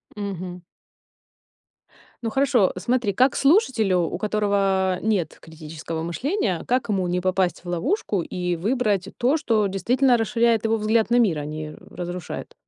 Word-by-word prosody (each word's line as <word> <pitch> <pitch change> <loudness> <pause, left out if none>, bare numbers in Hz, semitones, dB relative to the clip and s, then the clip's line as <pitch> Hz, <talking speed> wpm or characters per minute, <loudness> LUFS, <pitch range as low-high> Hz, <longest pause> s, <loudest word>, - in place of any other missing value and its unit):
Мгм. 185 -3 -5 1.6
Ну 225 - -1
хорошо, 250 -5 +2
смотри, 220 +2 0
как 255 +6 +3
слушателю, 260 - +3
у 170 0 -2
которого 195 -3 +1
нет 210 -6 -1
критического 160 0 -7
мышления, 190 - -2
как 250 -1 0
ему 190 -3 0
не 180 +1 -1
попасть 185 -1 0
в 175 - -8
ловушку 205 - -1
и 180 0 -3
выбрать 205 -1 0
то, 260 +6 +2
что 220 -8 +1
действительно 245 +6 +2
расширяет 230 0 +1
его 225 0 +2
взгляд 220 +1 +1
на 240 - +5
мир, 195 -10 +3
а 145 - -5
не 155 0 -6 0.2
разрушает? 175 -1 -6
200 Hz, 140 wpm, -23 LUFS, 180-235 Hz, 1.6 s, на